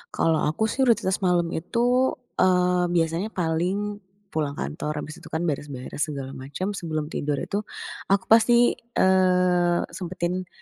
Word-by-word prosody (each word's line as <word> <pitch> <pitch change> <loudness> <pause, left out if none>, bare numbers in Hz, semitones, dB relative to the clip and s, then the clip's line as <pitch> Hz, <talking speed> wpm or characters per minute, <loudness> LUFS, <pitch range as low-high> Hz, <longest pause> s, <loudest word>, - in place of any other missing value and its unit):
Kalau 160 -1 +2
aku 160 +8 -1
sih 265 -1 +1
rutinitas 200 -5 +2
malem 175 -3 +1
itu, 245 +8 +1 0.2
eee, 180 -1 +3
biasanya 165 +4 +1
paling 190 +3 -1 0.3
pulang 150 -2 -2
kantor, 150 -1 -3
abis 155 - -9
itu - - -10
kan 160 +2 -1
beres-beres 145 -2 -3
segala 135 -2 -5
macem, 140 +9 -4
sebelum 155 -5 -3
tidur 145 0 -1
itu 205 +1 -3 0.5
aku 195 0 +3
pasti, 235 +2 +6
eee, 180 -5 +2
sempetin 180 0 -3
180 Hz, 135 wpm, -25 LUFS, 160-195 Hz, 0.5 s, pasti